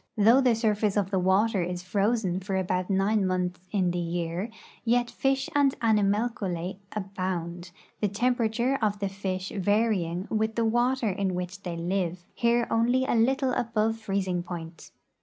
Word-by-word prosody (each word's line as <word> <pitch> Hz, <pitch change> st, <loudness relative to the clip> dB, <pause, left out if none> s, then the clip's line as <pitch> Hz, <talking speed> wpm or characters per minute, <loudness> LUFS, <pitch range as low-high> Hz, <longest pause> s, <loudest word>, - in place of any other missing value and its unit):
Though 225 Hz, +6 st, +6 dB
the 250 Hz, -3 st, +4 dB
surface 210 Hz, -2 st, +1 dB
of 195 Hz, -1 st, 0 dB
the 190 Hz, -, +2 dB
water 190 Hz, +3 st, +2 dB
is 180 Hz, +1 st, -3 dB
frozen 200 Hz, 0 st, 0 dB
for 190 Hz, +1 st, -3 dB
about 185 Hz, 0 st, -1 dB
nine 200 Hz, +2 st, +2 dB
months 180 Hz, -1 st, -1 dB
in 185 Hz, -4 st, +1 dB
the 175 Hz, -, -2 dB
year, 170 Hz, +4 st, -2 dB, 0.4 s
}'^et 240 Hz, +1 st, +2 dB
fish 270 Hz, 0 st, 0 dB
and 280 Hz, -2 st, +3 dB
animalculse 205 Hz, -4 st, 0 dB
abound, 185 Hz, -3 st, -4 dB, 0.3 s
the 210 Hz, -, +2 dB
temperature 240 Hz, +4 st, +1 dB
of 210 Hz, -2 st, +1 dB
the 200 Hz, -1 st, -2 dB
fish 190 Hz, -1 st, -4 dB
varying 195 Hz, -3 st, +1 dB
with 220 Hz, 0 st, 0 dB
the 230 Hz, -, +1 dB
water 240 Hz, 0 st, +2 dB
in 190 Hz, -1 st, -1 dB
which 180 Hz, +1 st, -5 dB
they 175 Hz, -3 st, -5 dB
live, 175 Hz, 0 st, -2 dB
here 235 Hz, 0 st, +2 dB
only 245 Hz, +3 st, +2 dB
a -, -, 0 dB
little 260 Hz, +3 st, +2 dB
above 225 Hz, -2 st, 0 dB
the -, -, -20 dB
freezing 190 Hz, -3 st, -1 dB
point. 170 Hz, -2 st, -8 dB
200 Hz, 160 wpm, -27 LUFS, 180-230 Hz, 0.4 s, Though